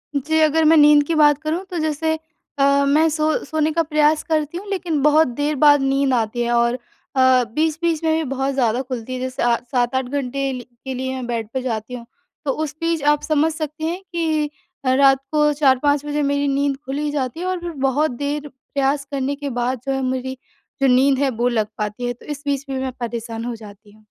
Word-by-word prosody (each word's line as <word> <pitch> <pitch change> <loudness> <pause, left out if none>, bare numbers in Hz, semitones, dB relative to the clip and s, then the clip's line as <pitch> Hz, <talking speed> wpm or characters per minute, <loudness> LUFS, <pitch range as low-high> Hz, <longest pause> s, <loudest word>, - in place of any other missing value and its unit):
जी, 315 +3 +1
अगर 315 +1 +3
मैं 320 +1 +6
नींद 295 0 +7
की 330 - 0
बात 295 -2 +5
करूँ 320 +4 -2
तो 360 - -4
जैसे 315 +1 0 0.5
अ, 280 0 +4
मैं 305 +3 +4
सो 310 0 0
सोने 315 +1 0
का 330 +1 +1
प्रयास 305 0 +2
करती 315 0 -1
हूँ, 395 - -8
लेकिन 350 -6 -1
बहुत 300 +2 +5
देर 290 +5 -2
बाद 290 0 +5
नींद 270 0 +1
आती 235 0 0
है। 240 0 0
और 235 0 +3
अ, 255 +1 +1
बीच-बीच 320 +2 0
में 320 -1 +2
भी 320 - 0
बहुत 270 +1 -1
ज़्यादा 245 -2 +1
खुलती 255 -2 -6
है 255 - -4
जैसे 255 0 -3
अ, 240 -1 +4 0.2
7-8 255 +1 +1
घंटे 275 +1 -2
ल 250 - -5 0.2
के 265 - -3
लिए 260 +1 -3
मैं 255 -1 -5
बेड 230 -3 -3
पे 260 - -1
जाती 225 -1 -4
हूँ, 240 -2 -7 0.4
तो 275 - +1
उस 300 0 -3
बीच 330 -2 0
आप 295 - -3
समझ 310 +1 +2
सकते 310 0 -5
हैं 345 +4 -2
कि 315 -3 0 0.4
रात 270 +1 +5
को 300 -1 +3
4-5 285 0 +2
बजे 295 0 -1
मेरी 285 0 +1
नींद 275 0 0
खुल 270 +2 -4
ही 300 0 -1
जाती 270 0 -3
है 360 - -3
और 370 -1 -1
फिर 345 0 -5 0.2
बहुत 290 +2 +1
देर 285 +3 -3
प्रयास 275 +1 -2
करने 280 0 -1
के 285 -1 -5
बाद 250 +1 -1
जो 270 - -1
है 270 - -1
मेरी 260 0 -3 0.4
जो 275 - +4
नींद 270 +1 +4
है 280 -1 +2
वो 240 0 -1
लग 220 -3 0
पाती 210 +3 -3
है, 245 - -1
तो 240 - -18
इस 290 -1 -6
बीच 280 -1 -1
भी 265 -1 -2
मैं 260 0 -2
परेशान 230 -1 -4
हो 245 - -3
जाती 210 -1 -14
हूँ। 215 +1 -22
280 Hz, 225 wpm, -21 LUFS, 255-305 Hz, 0.5 s, नींद